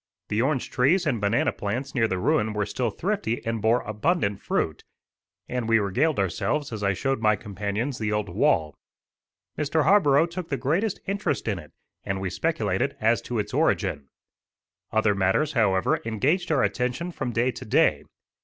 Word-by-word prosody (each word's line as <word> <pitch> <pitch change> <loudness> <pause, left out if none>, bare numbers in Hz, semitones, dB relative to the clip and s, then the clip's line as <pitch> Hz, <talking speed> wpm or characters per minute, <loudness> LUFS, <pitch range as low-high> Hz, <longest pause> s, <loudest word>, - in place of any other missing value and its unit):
The 105 +2 +1
orange 135 0 0
trees 170 +9 +3
and 125 -8 0
banana 100 +3 +2
plants 120 +7 -4
near 115 -4 +2
the 95 - -2
ruin 105 +4 +1
were 105 -1 0
still 120 +3 -1
thrifty 180 - -2
and 115 -1 -2
bore 115 +3 +3
abundant 105 - -1
fruit, 80 - -1 0.6
and 125 -2 -3
we 115 - +5
regaled 125 +10 +1
ourselves 115 - -1
as 110 - -5
I 100 -1 +2
showed 135 +7 -1
my 105 -1 +4
companions 105 +5 -3
the 110 -1 -1
old 105 -1 -1
wall. 75 -5 +1 0.9
Mr. 150 +1 +1
Harborough 160 -4 +5
took 175 0 -6
the 135 - -1
greatest 165 - 0
interest 200 - -2
in 100 -4 -1
it, 75 - -13 0.3
and 95 0 -2
we 95 -1 -3
speculated - - -1
as - - +2
to - - -4
its - - -3
origin. 70 -1 0 0.8
Other 110 -1 +3
matters, 100 +10 +1
however, 100 -6 +2
engaged 145 - 0
our 140 -4 +3
attention 125 +8 -1
from 125 - -4
day 120 +2 +1
to - - -9
day. - - +2
115 Hz, 170 wpm, -25 LUFS, 105-145 Hz, 0.9 s, we